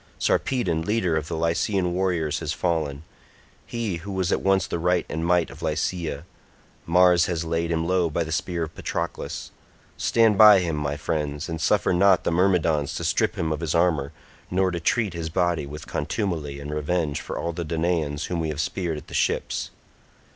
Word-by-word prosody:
Sarpedon 90 -12 +1
leader 90 -2 0
of 80 -1 -2
the 80 - -3
Lycian 90 +3 0
warriors 90 -5 0
has 80 -2 -3
fallen—he 85 +6 -4
who 95 +4 -8
was 95 -1 -1
at - - +1
once 95 -2 +2
the 85 - -3
right 90 0 +1
and 80 +2 -3
might 90 -1 +2
of - - -12
Lycia; 80 0 -2 0.6
Mars 90 0 +5
has 85 -2 -2
laid 85 +1 -1
him 80 -1 0
low 90 -2 +2
by 80 +2 -1
the 80 - -7
spear 85 +1 -1
of 80 0 -6
Patroclus. - - -4 0.5
Stand 110 -3 +3
by 105 -2 +10
him, 85 -4 0
my 75 -1 -2
friends, 75 -1 -2
and 80 -1 -4
suffer 100 +1 +2
not 95 +1 +4
the - - 0
Myrmidons 85 -5 +2
to - - -4
strip - - +1
him 80 -1 -1
of 75 - -1
his 80 0 -2
armour, 80 -5 +2 0.4
nor 95 0 +1
to 85 - -3
treat 105 +3 +1
his 85 -1 -4
body 85 -3 0
with 75 +1 -8
contumely 80 -9 -3
in 70 +1 -7
revenge 75 0 -1
for - - -6
all 85 - -2
the 85 +1 -4
Danaans 80 -2 -1
whom 90 -1 -2
we 80 -1 -1
have 75 -1 -4
speared 85 -1 -2
at 75 - -9
the - - -13
ships." - - 0
85 Hz, 190 wpm, -24 LUFS, 80-90 Hz, 0.6 s, by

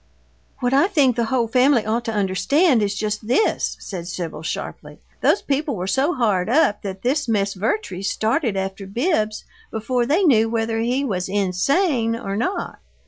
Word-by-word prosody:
"What 245 +1 +1
I 280 +7 +5
think 285 - +3
the 235 -1 0
whole 235 0 0
family 250 0 +3
ought 225 +2 0
to 225 - -2
understand 220 - +2
is 200 -1 0
just 210 +1 -3
this," 255 - +1
said 175 -4 -7
Sibyl, 175 -3 -5
sharply. 160 - -6 0.2
"Those - - +3
people 285 -1 -1
were 180 -2 -4
so 270 - +1
hard 210 -6 +1
up 240 -6 +3
that 190 -1 -6
this 280 +4 0
Miss 200 -3 0
Vertrees 200 - -2
started 225 -1 0
after 195 +1 -4
Bibbs 215 - -1 0.3
before 240 +2 -1
they 330 +9 +2
knew 225 -9 +4
whether 225 0 -1
he 250 +5 0
was 185 -6 -2
INSANE 230 - +1
or 195 -4 -4
not! 365 - -3
225 Hz, 170 wpm, -21 LUFS, 200-270 Hz, 0.3 s, I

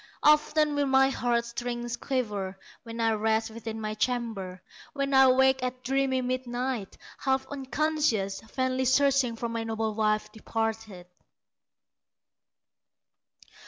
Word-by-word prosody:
Often 300 0 +4
will 285 -1 +1
my 270 0 +4
heart 235 -2 0
strings 240 0 -4
quiver 210 -8 -3 0.2
When 230 0 -8
I 225 -1 +3
rest 220 +1 0
within 225 0 -6
my 215 -1 -3
chamber, 215 -6 -2 0.3
When 275 -1 -1
I 265 0 +7
wake 265 0 +4
at 255 0 -4
dreamy 265 0 +1
midnight, 250 -3 -3 0.2
Half 265 0 0
unconscious, 270 -8 0
vainly 260 0 0
searching 260 -2 +3
For 235 +1 -3
my 230 0 -3
noble 220 -1 -2
wife 215 0 0
departed." 220 -4 -4
240 Hz, 120 wpm, -28 LUFS, 220-265 Hz, 0.3 s, I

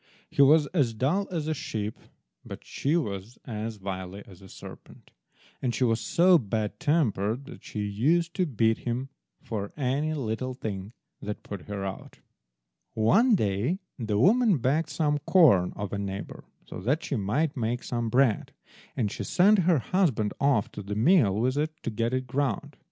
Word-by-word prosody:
He - - +2
was 150 +2 +6
as 130 -10 +1
dull 160 - 0
as 165 -4 -3
a 155 - +1
sheep, 110 -8 -4 0.5
but - - -9
she 150 +5 0
was 105 - -4
as 110 -2 -5
wily 95 0 -6
as 95 -2 -15
a 95 - -14
serpent, - - -13 0.5
and 120 -3 -1
she 130 - 0
was 115 -2 +2
so 175 0 +4
bad 110 -2 -3
tempered 135 - 0
that - - -12
she 105 - -5
used 155 +12 +1
to 185 -1 0
beat 115 -4 +1
him 125 +3 -3 0.3
for 105 -3 -4
any 145 +3 0
little 130 -1 -3
thing 105 -3 -5 0.3
that 105 0 -6
put 100 -4 -8
her 100 -1 -4
out. 95 0 -7 0.8
One 210 - +4
day 105 - 0 0.2
the 110 -3 -1
woman 215 - +4
begged 140 +6 0
some 150 -2 0
corn 150 - +4
of 100 -1 -5
a 100 - -2
neighbour 100 0 -6 0.2
so - - -8
that 135 - 0
she - - -2
might 125 +10 0
make 120 0 -2
some 120 -2 -2
bread, 125 -2 +2 0.4
and 105 -5 0
she - - -5
sent 200 +3 +4
her 170 - +5
husband 135 - +1
off 140 -7 +2
to - - -7
the 100 +1 -5
mill 115 - +4
with 125 +5 0
it 155 +1 0
to 115 - -2
get 115 +2 -1
it 130 0 -1
ground. 130 -3 -2
120 Hz, 175 wpm, -27 LUFS, 105-150 Hz, 0.8 s, was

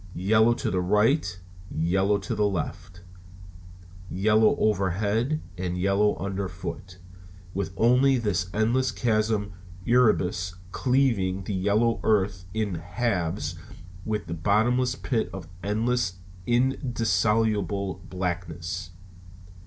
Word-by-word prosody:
Yellow 110 +6 +3
to - - -2
the 90 - +1
right 105 - +2 0.3
and 80 - -3
yellow 95 +3 +2
to 100 +4 -4
the 105 -1 +2
left, 90 0 -5 1.1
yellow 110 +3 +3
overhead 105 - 0 0.2
and 90 -1 -2
yellow 100 +3 +2
underfoot; 95 -1 -5 0.6
with 95 0 -2
only 125 +3 +4
this 100 -5 -1
endless 120 +6 +1
chasm 110 -3 +1
of 100 - -10 0.3
Erebus 95 -7 +2 0.2
cleaving 115 -9 +1
the 100 - -4
yellow 105 +5 +2
earth 95 -4 +1
in 105 -1 -1
halves 90 -2 -2 0.5
with 105 -2 -3
its 85 -1 -5
bottomless 120 +6 +2
pit 115 -4 -1
of 95 -4 -8
endless 110 +1 0 0.3
and 125 +3 +3
indissoluble 105 - 0
blackness. 90 0 -4
100 Hz, 110 wpm, -26 LUFS, 90-115 Hz, 1.1 s, only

